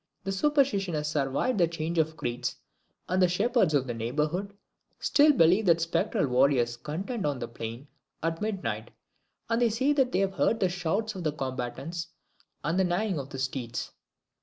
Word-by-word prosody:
The 195 Hz, -, -2 dB
superstition 200 Hz, -, +2 dB
has 150 Hz, 0 st, -1 dB
survived 145 Hz, -, 0 dB
the 170 Hz, -, +5 dB
change 165 Hz, 0 st, -2 dB
of 160 Hz, 0 st, 0 dB
creeds, 120 Hz, -2 st, -2 dB, 0.5 s
and 185 Hz, +2 st, +1 dB
the 180 Hz, -, +6 dB
shepherds 190 Hz, -, +2 dB
of 135 Hz, -2 st, +2 dB
the 120 Hz, -, -3 dB
neighbourhood 150 Hz, -, -2 dB, 0.4 s
still 300 Hz, +1 st, +5 dB
believe 185 Hz, -, +4 dB
that 170 Hz, -1 st, +5 dB
spectral 165 Hz, -3 st, +1 dB
warriors 125 Hz, -2 st, +3 dB
contend 190 Hz, -, -4 dB
on 145 Hz, -2 st, 0 dB
the 120 Hz, -, -4 dB
plain 115 Hz, +4 st, -7 dB, 0.4 s
at 165 Hz, +1 st, -1 dB
midnight, 120 Hz, -, -3 dB, 0.6 s
and 230 Hz, +1 st, +1 dB
they 240 Hz, -, +4 dB
say 260 Hz, +7 st, +2 dB
that 265 Hz, -3 st, +2 dB
they -, -, +1 dB
have 195 Hz, 0 st, +1 dB
heard 225 Hz, +3 st, +1 dB
the 185 Hz, -, +2 dB
shouts 190 Hz, +5 st, -1 dB
of 185 Hz, -3 st, -6 dB
the 155 Hz, -, +1 dB
combatants 135 Hz, +4 st, -4 dB, 0.6 s
and 165 Hz, +4 st, 0 dB
the -, -, +4 dB
neighing 180 Hz, 0 st, 0 dB
of 135 Hz, 0 st, -6 dB
the 135 Hz, -, -7 dB
steeds. 130 Hz, -2 st, -3 dB
165 Hz, 180 wpm, -28 LUFS, 135-195 Hz, 0.6 s, the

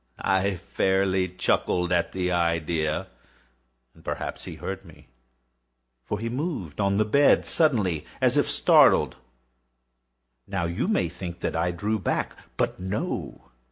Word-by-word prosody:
I 95 Hz, 0 st, +2 dB
fairly 95 Hz, +2 st, +1 dB
chuckled 90 Hz, 0 st, 0 dB
at 85 Hz, -1 st, +1 dB
the 90 Hz, -1 st, -1 dB
idea; 85 Hz, -2 st, 0 dB, 0.9 s
and -, -, -20 dB
perhaps -, -, -4 dB
he -, -, -7 dB
heard 95 Hz, 0 st, -5 dB
me; 85 Hz, -8 st, -17 dB, 0.9 s
for 105 Hz, -, -4 dB
he 115 Hz, +3 st, -4 dB
moved 120 Hz, -, -3 dB
on 100 Hz, 0 st, +2 dB
the 110 Hz, -, +3 dB
bed 140 Hz, +7 st, +4 dB
suddenly, 105 Hz, -, +1 dB
as -, -, +3 dB
if -, -, +2 dB
startled. -, -, +5 dB, 1.3 s
Now 95 Hz, -3 st, -2 dB
you 85 Hz, -, -1 dB
may 210 Hz, -, +1 dB
think 85 Hz, 0 st, -7 dB
that -, -, -2 dB
I 80 Hz, +2 st, +1 dB
drew 105 Hz, +5 st, -1 dB
back—but 90 Hz, -, -2 dB
no. 95 Hz, -, -4 dB
95 Hz, 130 wpm, -26 LUFS, 85-100 Hz, 1.3 s, startled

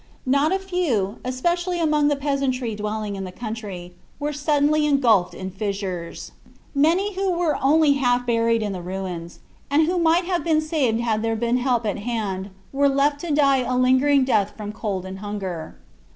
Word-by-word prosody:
Not 280 Hz, +4 st, +2 dB
a 380 Hz, -, +2 dB
few, 335 Hz, -, -1 dB
especially 345 Hz, +8 st, -1 dB
among 300 Hz, -3 st, +2 dB
the 290 Hz, -, +2 dB
peasantry 275 Hz, -4 st, -1 dB
dwelling 210 Hz, 0 st, -3 dB
in 195 Hz, -, -5 dB
the 185 Hz, -, -6 dB
country, 200 Hz, -4 st, -7 dB, 0.3 s
were 295 Hz, +1 st, -2 dB
suddenly 295 Hz, +1 st, +2 dB
engulfed 230 Hz, -11 st, +3 dB
in 190 Hz, 0 st, -6 dB
fissures. 195 Hz, -3 st, -4 dB, 0.4 s
Many 340 Hz, +8 st, +2 dB
who 385 Hz, +1 st, -1 dB
were 340 Hz, -4 st, 0 dB
only 295 Hz, +1 st, +4 dB
half 245 Hz, -3 st, +1 dB
buried 230 Hz, -1 st, +2 dB
in 205 Hz, -, -2 dB
the 185 Hz, -2 st, -5 dB
ruins, 180 Hz, -2 st, -6 dB, 0.3 s
and 290 Hz, +3 st, +4 dB
who 355 Hz, +2 st, 0 dB
might 335 Hz, +2 st, +3 dB
have 350 Hz, -3 st, -1 dB
been 320 Hz, -2 st, +2 dB
saved 295 Hz, -8 st, 0 dB
had 220 Hz, -2 st, 0 dB
there 225 Hz, 0 st, 0 dB
been 235 Hz, +2 st, +1 dB
help 245 Hz, -2 st, 0 dB
at 210 Hz, 0 st, -1 dB
hand, 205 Hz, -4 st, -3 dB, 0.2 s
were 280 Hz, +1 st, +3 dB
left 285 Hz, +1 st, +2 dB
to 340 Hz, +1 st, -4 dB
die 280 Hz, -2 st, +4 dB
a 250 Hz, 0 st, -1 dB
lingering 260 Hz, +2 st, +4 dB
death 210 Hz, -6 st, +1 dB
from 210 Hz, -1 st, -5 dB
cold 200 Hz, -4 st, -4 dB
and 190 Hz, 0 st, -7 dB
hunger. 190 Hz, -6 st, -5 dB
250 Hz, 180 wpm, -23 LUFS, 210-295 Hz, 0.4 s, only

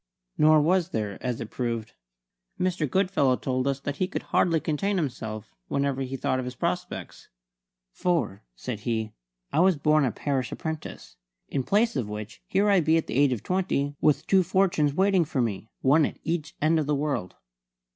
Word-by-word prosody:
Nor 155 Hz, 0 st, +5 dB
was 175 Hz, +3 st, +2 dB
there, 105 Hz, -, -3 dB
as 125 Hz, -2 st, -2 dB
it 115 Hz, -, -6 dB
proved. 115 Hz, -3 st, -3 dB, 0.7 s
Mr. 180 Hz, -5 st, 0 dB
Goodfellow 185 Hz, -8 st, +2 dB
told 130 Hz, +1 st, -1 dB
us 135 Hz, -1 st, 0 dB
that 145 Hz, 0 st, -4 dB
he 185 Hz, -, +1 dB
could 195 Hz, -, -4 dB
hardly 165 Hz, -2 st, +2 dB
contain 190 Hz, +7 st, -1 dB
himself 110 Hz, -, -4 dB
whenever 140 Hz, -1 st, 0 dB
he 135 Hz, 0 st, -3 dB
thought 130 Hz, +1 st, 0 dB
of 130 Hz, -, -3 dB
his 125 Hz, 0 st, -6 dB
prospects; -, -, -4 dB, 0.6 s
"for," 170 Hz, -, -1 dB
said 115 Hz, -, -5 dB
he, 110 Hz, 0 st, -2 dB, 0.4 s
"I -, -, +2 dB
was 185 Hz, -2 st, +4 dB
born 150 Hz, +1 st, +3 dB
a 130 Hz, -, +1 dB
parish 135 Hz, -1 st, -2 dB
apprentice; 160 Hz, -2 st, -6 dB, 0.3 s
in 140 Hz, -, 0 dB
place 210 Hz, -, +2 dB
of 120 Hz, -7 st, -2 dB
which 105 Hz, +1 st, -7 dB
here 200 Hz, +2 st, +2 dB
I 200 Hz, -2 st, +5 dB
be 160 Hz, 0 st, +3 dB
at 165 Hz, -, 0 dB
the -, -, -6 dB
age 140 Hz, 0 st, +4 dB
of 120 Hz, -5 st, -2 dB
twenty 175 Hz, -7 st, 0 dB
with 150 Hz, -2 st, +3 dB
two 190 Hz, -1 st, +4 dB
fortunes 175 Hz, -5 st, +2 dB
waiting 190 Hz, -1 st, +4 dB
for 145 Hz, -3 st, -3 dB
me, 110 Hz, -2 st, -2 dB
one 145 Hz, +3 st, +4 dB
at -, -, -9 dB
each 165 Hz, -1 st, -3 dB
end 160 Hz, +2 st, +3 dB
of 150 Hz, -, -1 dB
the 150 Hz, -, +2 dB
world." 140 Hz, -10 st, -2 dB
145 Hz, 185 wpm, -26 LUFS, 125-170 Hz, 0.7 s, Nor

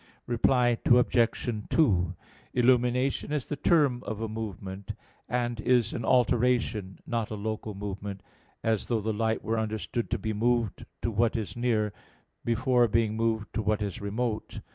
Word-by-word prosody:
Reply 120 Hz, 0 st, +2 dB
Obj. 120 Hz, 0 st, +3 dB, 0.2 s
2: 100 Hz, -, +3 dB, 0.4 s
Illumination 125 Hz, +2 st, +2 dB
is 150 Hz, -3 st, -1 dB
the 145 Hz, -, -3 dB
term 140 Hz, -5 st, +3 dB
of 110 Hz, -1 st, -4 dB
a 115 Hz, -, -2 dB
movement; 100 Hz, -3 st, -6 dB, 0.4 s
and 120 Hz, -1 st, -1 dB
is 120 Hz, -2 st, +2 dB
an 120 Hz, -, -3 dB
alteration, 120 Hz, -5 st, +2 dB
not 115 Hz, -2 st, -2 dB
a 110 Hz, -, -4 dB
local 110 Hz, 0 st, -4 dB
movement, 100 Hz, -1 st, -5 dB, 0.4 s
as 110 Hz, -3 st, 0 dB
though 115 Hz, -2 st, +1 dB
the 110 Hz, +1 st, -1 dB
light 110 Hz, +1 st, 0 dB
were 115 Hz, 0 st, 0 dB
understood 110 Hz, +2 st, -2 dB
to -, -, 0 dB
be 110 Hz, -1 st, -3 dB
moved 115 Hz, -1 st, 0 dB, 0.2 s
to 115 Hz, -, 0 dB
what 115 Hz, +2 st, +2 dB
is 110 Hz, -3 st, -3 dB
near, 110 Hz, -4 st, +1 dB, 0.5 s
before 120 Hz, +1 st, +3 dB
being 110 Hz, 0 st, +1 dB
moved 110 Hz, -2 st, -1 dB
to -, -, 0 dB
what 105 Hz, 0 st, 0 dB
is 100 Hz, -2 st, -4 dB
remote. 110 Hz, +2 st, -3 dB
115 Hz, 155 wpm, -28 LUFS, 105-120 Hz, 0.5 s, Obj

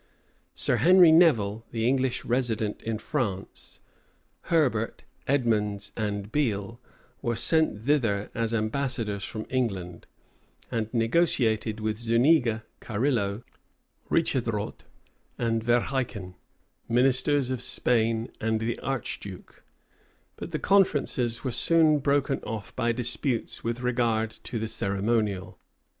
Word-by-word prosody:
Sir -, -, +2 dB
Henry 180 Hz, -1 st, +7 dB
Nevil, 115 Hz, -, +4 dB
the 115 Hz, 0 st, -1 dB
English 130 Hz, -1 st, 0 dB
resident 115 Hz, -4 st, -1 dB
in 115 Hz, -1 st, -3 dB
France, 105 Hz, -, -4 dB, 0.7 s
Herbert, 130 Hz, -10 st, +1 dB, 0.2 s
Edmondes, 105 Hz, -7 st, 0 dB
and 105 Hz, -1 st, -3 dB
Beale, 115 Hz, -5 st, -1 dB, 0.4 s
were 120 Hz, 0 st, -1 dB
sent 155 Hz, -7 st, +3 dB
thither 115 Hz, -8 st, +1 dB
as 115 Hz, -1 st, -1 dB
ambassadors 115 Hz, -2 st, -1 dB
from 110 Hz, +1 st, -5 dB
England; 95 Hz, -9 st, -2 dB, 0.6 s
and 110 Hz, -1 st, -2 dB
negotiated 115 Hz, -4 st, +1 dB
with 110 Hz, 0 st, -2 dB
Zuniga, 115 Hz, 0 st, +3 dB, 0.2 s
Carillo, 110 Hz, -2 st, -1 dB, 0.7 s
Richetrdot, -, -, -1 dB, 0.5 s
and 115 Hz, -1 st, 0 dB
Verheiken, 120 Hz, -5 st, -1 dB, 0.6 s
ministers 130 Hz, +2 st, +2 dB
of 130 Hz, -2 st, -2 dB
Spain 115 Hz, -2 st, 0 dB
and 110 Hz, 0 st, 0 dB
the 115 Hz, +1 st, -2 dB
archduke: 105 Hz, -7 st, -6 dB, 0.7 s
but -, -, -7 dB
the -, -, -2 dB
conferences 140 Hz, -11 st, +1 dB
were 130 Hz, -, -1 dB
soon 155 Hz, +3 st, +3 dB
broken 140 Hz, 0 st, +1 dB
off, 110 Hz, -2 st, -7 dB
by 120 Hz, -2 st, +1 dB
disputes 120 Hz, +1 st, -2 dB
with 115 Hz, +1 st, -3 dB
regard 120 Hz, -3 st, 0 dB
to 115 Hz, -, -7 dB
the 110 Hz, 0 st, -2 dB
ceremonial. 100 Hz, -1 st, -1 dB
115 Hz, 110 wpm, -27 LUFS, 110-130 Hz, 0.7 s, Henry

